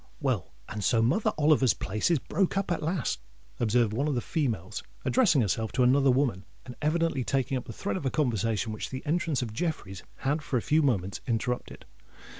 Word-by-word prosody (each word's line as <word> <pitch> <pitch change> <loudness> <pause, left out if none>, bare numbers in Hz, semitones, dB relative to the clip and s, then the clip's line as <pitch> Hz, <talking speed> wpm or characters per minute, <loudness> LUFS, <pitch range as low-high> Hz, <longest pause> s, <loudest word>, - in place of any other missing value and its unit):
"Well, 130 - -1 0.2
and 105 -1 -5
so 115 +3 +3
Mother 135 - +2
Oliver's 145 -5 +4
place 105 - -1
is 170 - +4
broke 190 +7 0
up 195 -2 -1
at 170 - 0
last," 155 - -1 0.4
observed 115 -1 +2
one 140 +7 0
of 145 - 0
the - - +1
females, 115 - -2 0.2
addressing 205 - +4
herself 110 +1 0
to 130 - +3
another 135 +2 +4
woman, 125 -7 +1 0.2
and 125 - -8
evidently 155 -3 +1
taking 135 +1 0
up 125 - -3
the 115 - -7
thread 100 -2 -3
of - - -6
a - - +2
conversation 115 -5 0
which 110 - -5
the 130 +2 -6
entrance 160 -3 0
of 110 -3 -6
Jeffreys 110 - -3
had 145 +4 -1
for 140 -3 -1
a - - 0
few 155 +1 +3
moments 100 -9 0
interrupted. 120 +1 -2
130 Hz, 200 wpm, -28 LUFS, 110-150 Hz, 0.4 s, Oliver's